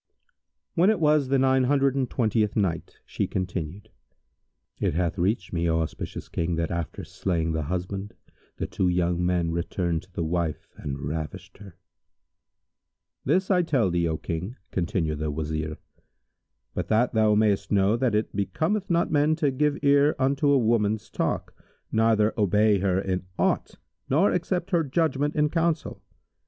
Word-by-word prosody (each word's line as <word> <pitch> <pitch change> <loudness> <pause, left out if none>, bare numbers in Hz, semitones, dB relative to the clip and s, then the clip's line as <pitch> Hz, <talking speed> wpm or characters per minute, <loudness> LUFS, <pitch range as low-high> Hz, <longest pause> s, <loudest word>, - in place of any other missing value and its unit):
When 180 +4 +4
it 215 -4 +2
was 150 -3 +3
the 135 +1 +2
Nine 130 0 +3
Hundred 135 0 +3
and 135 -3 -1
Twentieth 110 -3 +1
Night, 90 -6 -1
She - - -2
continued: 95 +2 -4 0.9
It - - 0
hath 90 +1 -1
reached 95 +1 0
me, 85 0 0
O 80 0 +2
auspicious 80 -1 -5
King, 85 +1 -2
that 85 0 -2
after 85 -2 -4
slaying 85 -4 -2
the 80 0 -1
husband 90 +5 -4 0.4
the - - -2
two 95 - -1
young 90 0 +1
men 90 -2 +1
returned 85 -1 -1
to 95 - -22
the 85 - -3
wife 80 -1 -2
and 70 -1 -5
ravished 75 +5 -5
her. 100 -4 -12 1.5
"This 185 +8 +2
I 180 -2 +4
tell 135 - +1
thee, 85 -1 +1
O 80 -1 -1
King," 90 +10 -4 0.2
continued 85 -4 -1
the 75 0 -1
Wazir, 80 +1 -3 1.0
"But - - -3
that 115 +3 +2
thou 110 -1 +4
mayst 105 -2 +1
know 100 +1 +3
that 120 -2 +1
it 105 -1 -1
becometh 160 - -1
not 170 -1 +1
men 150 +1 +3
to 150 -3 +1
give 145 +2 +1
ear 145 +1 +4
unto 140 +2 +1
a 140 - +5
woman's 110 -2 +1
talk - - -2 0.4
neither 110 -1 +3
obey 105 0 +3
her 95 -1 +1
in 95 -1 -2
aught - - 0 0.3
nor 160 +10 +4
accept 180 +1 -1
her 170 -3 +3
judgment 150 0 0
in 150 -1 +2
counsel. 165 -1 -1
105 Hz, 160 wpm, -26 LUFS, 85-140 Hz, 1.5 s, a